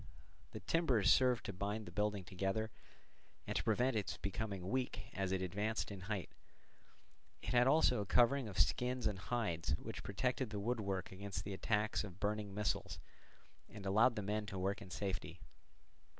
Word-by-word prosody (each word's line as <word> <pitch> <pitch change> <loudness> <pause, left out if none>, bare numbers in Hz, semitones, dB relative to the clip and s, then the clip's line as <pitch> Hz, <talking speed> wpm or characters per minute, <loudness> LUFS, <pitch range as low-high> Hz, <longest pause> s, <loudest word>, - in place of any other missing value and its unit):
The - - -7
timbers 130 - +4
served 125 -2 +3
to 100 - -3
bind 105 +4 -2
the - - -8
building 105 -2 0
together, 95 +4 -2 0.7
and - - -3
to - - +1
prevent 125 +3 +2
its 105 -3 -1
becoming 100 -2 -3
weak 115 -3 -2
as 95 -2 -1
it 95 -1 0
advanced 105 +5 -1
in 100 - -6
height; 100 -4 -2 1.1
it - - -3
had 120 +3 +5
also 135 -5 +5
a - - -3
covering 125 +3 +4
of 100 - -7
skins 125 0 +2
and 100 -3 +1
hides, 95 -9 0
which - - -6
protected 125 +4 -1
the 105 -2 -3
woodwork 100 -4 -1
against 100 +1 -5
the 100 - -4
attacks 105 +3 +1
of 95 -2 -9
burning 105 -1 -1
missiles 105 +1 -1 0.7
and 105 -2 -9
allowed 110 +5 +5
the 105 - -2
men 105 +1 -1
to 95 -2 -5
work 95 +2 -1
in 95 - -9
safety. 95 +1 -3
105 Hz, 170 wpm, -38 LUFS, 95-115 Hz, 1.1 s, had